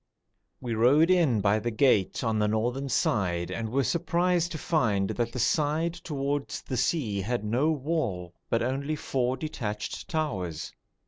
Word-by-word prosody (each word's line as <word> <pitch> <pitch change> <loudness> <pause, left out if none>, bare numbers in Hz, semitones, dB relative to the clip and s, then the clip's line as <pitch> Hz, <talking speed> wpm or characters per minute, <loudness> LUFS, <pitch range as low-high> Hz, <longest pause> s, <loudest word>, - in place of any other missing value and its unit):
We 120 -2 -3
rode 140 +10 +4
in 155 - +3
by 105 +2 +3
the 120 +3 -2
gate 110 -4 +2
on 110 -2 +1
the 105 - +2
northern 120 +6 -1
side 90 -8 0
and 115 -1 -3
were 135 +4 +1
surprised 175 +3 +1
to - - -3
find 110 - +1
that 120 -1 -1
the 125 - -6
side 155 +5 +1
towards 145 -4 -3
the 130 - -4
sea 120 -5 0
had 120 +3 -2
no 120 +9 +1
wall, 130 - -2 0.2
but 115 - +1
only 140 +5 -1
four 130 -3 -1
detached 110 -8 -5
towers. 95 - -3
125 Hz, 155 wpm, -28 LUFS, 110-155 Hz, 0.2 s, rode